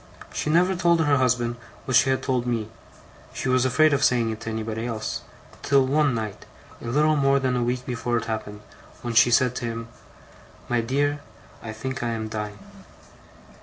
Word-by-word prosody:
She - - -2
never 180 +4 +3
told 170 -1 +3
her 145 -2 +3
husband 120 -2 +1 0.3
what 130 - 0
she 135 - +5
had 130 - 0
told 125 -2 0
me 115 -3 -1 0.7
she 135 - -2
was 130 0 +3
afraid 145 +4 +4
of 140 - +1
saying 120 -2 +3
it 110 - -6
to 115 - -5
anybody 110 +1 -3
else 110 -2 -3 0.4
till 140 -1 +3
one 140 -1 +2
night, 110 -3 -5 0.4
a - - -9
little 150 +5 +3
more 140 -1 +3
than 130 -2 0
a 125 - 0
week 125 +1 -1
before 120 -2 -1
it - - -3
happened, 105 -2 -5 0.4
when 120 -1 -3
she 120 +1 +6
said 125 +1 +3
to 120 - -3
him: 115 0 -5 0.8
"My 120 -1 +1
dear, 145 +5 0 0.4
I 110 - -6
think 130 +5 -5
I 120 -1 -1
am 110 -1 -4
dying." 105 -1 -5
125 Hz, 190 wpm, -24 LUFS, 115-135 Hz, 0.8 s, she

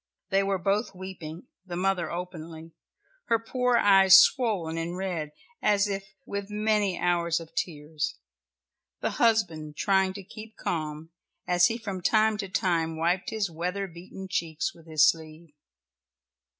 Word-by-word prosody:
They 195 0 +4
were 195 0 0
both 195 +3 0
weeping, 180 -4 -8 0.2
the 180 -2 -7
mother 185 -1 0
openly, 165 -2 -7 0.5
her 230 - +3
poor 250 +2 +1
eyes 195 -2 +7
swollen 195 -7 +4
and 165 +2 -3
red 175 -6 -3 0.3
as 205 -1 +3
if 195 -1 -5
with 200 0 -5
many 210 -2 +1
hours 170 -1 +1
of 165 0 -12
tears, 150 -2 -3 0.8
the - - 0
husband 170 -10 +1
trying 190 -1 +2
to 200 0 -8
keep 215 +3 -11
calm, 155 0 -4 0.3
as 175 0 +4
he 230 - -2
from 200 -6 -5
time 215 +3 +3
to 200 -2 -4
time 165 -3 0
wiped 175 +3 0
his 210 -5 -2
weather 180 +5 -2
beaten 185 +2 -10
cheeks 165 -4 -2
with 165 -1 -18
his 155 -1 +5
sleeve. 160 0 -2
180 Hz, 145 wpm, -27 LUFS, 165-200 Hz, 0.8 s, eyes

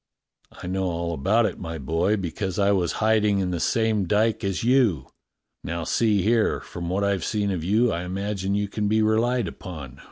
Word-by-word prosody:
"I - - -11
know 95 +1 -1
all 85 -1 -2
about 100 +10 +2
it, - - -3
my 80 -2 -5
boy, 80 +9 0
because 95 0 -4
I 100 0 +3
was 90 -4 +1
hiding 105 -2 +3
in 95 -2 -1
the 85 - -2
same 110 -1 +1
dyke 110 +4 +1
as 95 -5 -2
you. 115 - +3 0.6
Now 85 0 -3
see 105 +2 +1
here, 110 +1 +2
from 85 -1 -7
what 95 +3 0
I've 100 -3 0
seen 105 -2 -1
of 90 -4 -3
you, 110 +6 +2
I 85 - -2
imagine 100 +1 -2
you 105 0 0
can 105 +1 -2
be 110 +1 +2
relied 115 +1 +1
upon. 75 -6 -9
100 Hz, 195 wpm, -24 LUFS, 85-110 Hz, 0.6 s, I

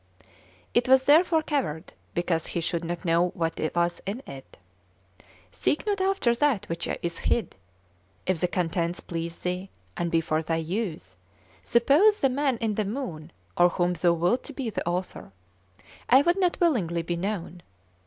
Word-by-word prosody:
It 240 - +2
was 265 0 +6
therefore 320 +3 +5
covered, 245 - -2 0.2
because 170 -2 0
he - - -2
should 170 0 -2
not 170 +1 -4
know 170 +1 +3
what 165 -3 -2 0.2
was 175 0 0
in 225 +7 -4
it. 135 -1 -11 0.9
Seek 95 - -1
not 405 -2 0
after 380 -11 +2
that 235 -5 +1
which 165 0 -4
is 170 -1 -3
hid; 235 - 0 0.7
if 185 -3 0
the 180 - +1
contents 175 -1 -1
please 170 0 -5
thee, 180 +2 -3 0.3
and 170 - -1
be 165 - +2
for 155 -1 0
thy 165 +1 -1
use, 165 - -3 0.5
suppose 300 - +4
the 270 - +3
Man 270 -1 0
in 225 -2 -1
the 210 0 -1
Moon, 195 - -5 0.2
or 175 0 +5
whom 175 0 0
thou 175 -1 +2
wilt 175 +9 +1
to 290 - -8
be 255 -4 -3
the 185 - -4
author; 180 - -3 0.8
I 265 +3 +7
would 345 +4 +2
not 360 -2 +1
willingly 185 - +1
be 175 +1 -2
known. 180 -1 -4
180 Hz, 165 wpm, -26 LUFS, 170-260 Hz, 0.9 s, I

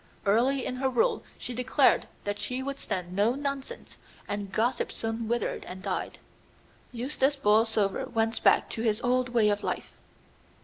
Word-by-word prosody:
Early 245 +6 +3
in 255 - -3
her 265 +1 +1
rule 455 - +1
she 250 - -5
declared 250 +1 +3 0.2
that 205 0 -3
she 255 +1 -2
would 275 0 -4
stand 180 -1 -4
no 215 +5 +3
nonsense, 280 -1 -5 0.3
and 205 -1 -4
gossip 235 +5 0
soon 225 0 -3
withered 235 +1 -1
and 185 +1 -8
died. - - -3 0.7
Eustace 265 +3 0
Borlsover 215 -4 +2
went 225 0 0
back - - +5
to 225 - -3
his 220 -2 +1
old 250 0 +2
way 230 -3 +3
of 205 0 0
life. - - -3
235 Hz, 160 wpm, -28 LUFS, 210-260 Hz, 0.7 s, back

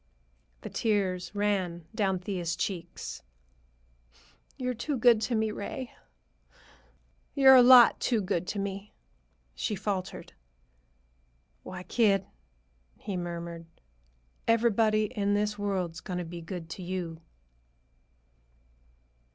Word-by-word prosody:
The - - -7
tears 190 -4 -1
ran 190 -5 -1
down 195 -4 +1
Thea's 180 -2 -3
cheeks. 175 -2 -5 1.4
"You're 250 -2 -2
too 265 +4 -3
good 235 -2 +5
to 235 +2 -1
me, 220 -1 +1
Ray. 240 +5 -6 1.4
You're 270 -2 +8
a 255 - +9
lot 245 -1 +8
too 235 -3 +1
good 185 -3 -2
to 205 - -3
me," 200 +1 -5 0.6
she 210 - -2
faltered. 195 -1 -4 1.3
"Why, 185 -1 -8
kid," 195 -3 +2 0.7
he 200 -3 -5
murmured, 170 -1 -5 0.8
"everybody 225 -2 +3
in 205 -2 -1
this 210 0 -1
world's 185 -4 -2
going 180 - -5
to 180 - -3
be 170 +1 -8
good 165 0 -7
to 185 - -7
you!" 175 -3 -5
200 Hz, 110 wpm, -29 LUFS, 180-220 Hz, 1.4 s, a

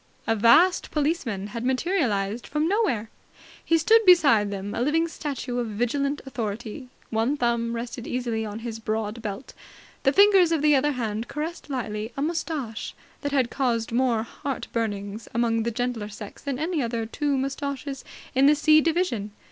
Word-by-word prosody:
A 225 - +2
vast 235 - +5
policeman 285 - -1
had 230 -1 -4
materialized 245 - 0
from 300 +2 0
nowhere. 345 - 0 0.5
He 330 - +3
stood 445 +8 +5
beside 290 - +6
them, 200 0 -5
a - - -2
living 320 +6 +2
statue 275 -6 -4
of 240 - -1
Vigilant 275 +7 -1
Authority. 235 0 -5 0.2
One 230 +6 +1
thumb 235 -2 0
rested 235 0 -5
easily 240 -3 -2
on 210 -1 -5
his 225 -1 -5
broad 220 +1 -3
belt. 215 +4 -6 0.5
The 270 - +3
fingers 390 -1 +6
of 320 -3 +1
the 300 -1 +5
other 290 +2 +2
hand 225 -2 -3
caressed 310 +2 -5
lightly 220 -4 -3
a - - -1
moustache 310 -8 -3 0.3
that 285 - -2
had 260 -4 +1
caused 235 -5 0
more 235 -2 +2
heart 275 +4 -5
burnings 210 -1 -3
among 230 -1 +2
the 230 - 0
gentler 235 -2 -3
sex 210 0 -10
than 280 -3 -3
any 320 +2 -1
other 230 -2 -2
two 280 +5 -1
moustaches 275 0 -3 0.3
in 265 +1 +5
the 300 - +6
C 310 +1 +5
division. 310 - 0
250 Hz, 165 wpm, -25 LUFS, 225-295 Hz, 0.5 s, beside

